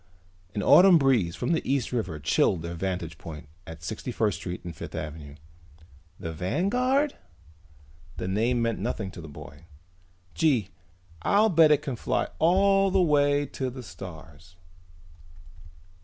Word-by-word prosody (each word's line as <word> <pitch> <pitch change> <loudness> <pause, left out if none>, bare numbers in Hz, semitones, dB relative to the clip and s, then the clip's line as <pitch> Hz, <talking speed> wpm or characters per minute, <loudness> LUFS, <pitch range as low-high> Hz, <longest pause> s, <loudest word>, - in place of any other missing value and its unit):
An 100 - -1
autumn 185 -1 +7
breeze 125 - +2
from - - -2
the 165 - +1
East 135 -3 -1
River 110 -11 -3
chilled 80 +3 +1
their 85 0 -5
vantage 85 -2 -4
point 75 -3 -9 0.2
at 80 -1 -10
Sixty 110 +7 -5
First 105 -5 0
Street 90 -1 -6
and 85 -2 -7
Fifth - - -8
Avenue. 75 -1 -7 0.8
"The 80 - -5
Vanguard?" 245 - 0 1.0
The - - -4
name 115 +5 +1
meant 115 -1 -1
nothing 100 -3 -3
to 85 - -10
the 80 - -9
boy. 75 +1 -12 0.7
"Gee, 140 -9 +1 0.5
I'll 210 - +3
bet 165 -4 +6
it 150 -1 +3
can 135 - -3
fly - - -1
all 195 +3 +4
the 190 0 +2
way 145 -4 +3
to 130 -2 -4
the 125 0 -9
stars!" 85 -3 -11
115 Hz, 145 wpm, -26 LUFS, -, 1.0 s, autumn